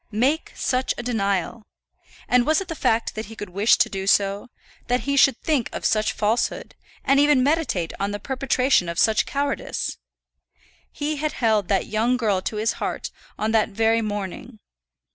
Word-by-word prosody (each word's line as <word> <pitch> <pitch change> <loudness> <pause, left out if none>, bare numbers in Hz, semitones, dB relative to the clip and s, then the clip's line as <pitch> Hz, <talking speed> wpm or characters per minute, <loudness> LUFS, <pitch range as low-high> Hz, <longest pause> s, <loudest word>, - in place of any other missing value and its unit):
Make 265 +9 +1
such 255 0 -1
a 240 - -5
denial! 200 -3 -1 0.7
And 250 0 +4
was 310 +4 +2
it 385 -2 -7
the - - -2
fact 230 -7 0
that 220 0 -6
he 225 - -10
could 205 -4 -8
wish 200 +5 +3
to - - +3
do 195 -1 -5
so, 200 +3 +2 0.4
that 250 +1 +1
he 280 0 -1
should 275 -1 +5
think 290 -7 0
of - - -6
such 215 0 +2
falsehood, 215 +3 -1 0.3
and 275 +1 +4
even 290 -3 +4
meditate 260 - 0
on 200 - -1
the 205 - -3
perpetration 260 -5 +1
of 170 - -5
such 220 +3 +3
cowardice? 280 0 -3 0.9
He 300 +1 -3
had 305 +1 -2
held 220 -5 +1
that 195 -2 +1
young 230 +4 +1
girl 210 -6 0
to 215 - -4
his 220 +2 0
heart - - -3 0.3
on 215 +1 -1
that 220 -1 +2
very 225 +2 +2
morning. 215 +3 -5
225 Hz, 180 wpm, -23 LUFS, 205-270 Hz, 0.9 s, should